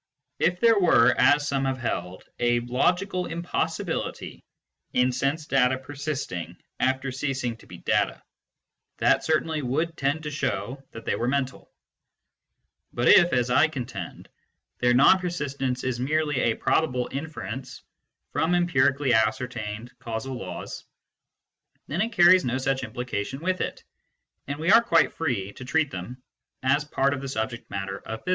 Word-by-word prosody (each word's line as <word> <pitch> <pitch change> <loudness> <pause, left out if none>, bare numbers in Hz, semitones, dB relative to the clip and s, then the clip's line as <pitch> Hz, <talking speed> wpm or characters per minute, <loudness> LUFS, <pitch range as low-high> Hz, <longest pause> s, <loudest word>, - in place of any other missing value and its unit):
If 175 +1 +1
there 230 -1 +5
were, 130 -9 +5
as 145 0 +4
some 135 -1 0
have 135 -1 -1
held, 90 -7 -4 0.2
a 120 0 +2
logical 180 +10 0
impossibility 170 +1 -3 0.5
in 125 +1 +3
sense 140 +5 -1
data 130 -2 +2
persisting 135 - -5 0.2
after 130 +1 0
ceasing 135 -3 -2
to - - -18
be - - -10
data, - - 0 0.7
that - - +3
certainly 160 0 0
would 155 +6 -1
tend 145 +3 -1
to 150 - -4
show 130 -1 -3
that 115 -1 -10
they - - 0
were 120 - -2
mental; 135 0 -2 1.2
but 120 0 +1
if, 175 -2 +7
as 125 -1 +1
I 145 +5 +5
contend, 125 - -7 0.5
their 125 0 +3
non 145 +9 +6
persistence 140 -8 -3
is 130 -2 -2
merely 150 +1 0
a 115 -3 +2
probable 125 -6 +1
inference 135 -3 -6 0.5
from 170 +2 +1
empirically 145 -5 +2
ascer 110 +2 +2
tained 110 0 -6
causal 120 +1 -5
laws, 95 -8 -7 1.0
then 170 +6 -2
it 225 +2 0
carries 180 -2 +6
no 125 +1 -1
such 135 0 -1
implication 125 0 -4
with 185 +3 -1
it, - - -4 0.6
and 140 +1 -3
we 165 +5 +1
are 230 +2 +8
quite 165 -9 +3
free 110 -11 -2
to - - -10
treat 145 +3 +1
them 120 +8 -7 0.4
as 140 +3 +3
part 140 -1 +1
of 140 - -4
the 135 - -5
subject 115 0 -4
matter 95 0 -4
of 110 0 -7
physics. - - -5
135 Hz, 150 wpm, -26 LUFS, 120-155 Hz, 1.2 s, are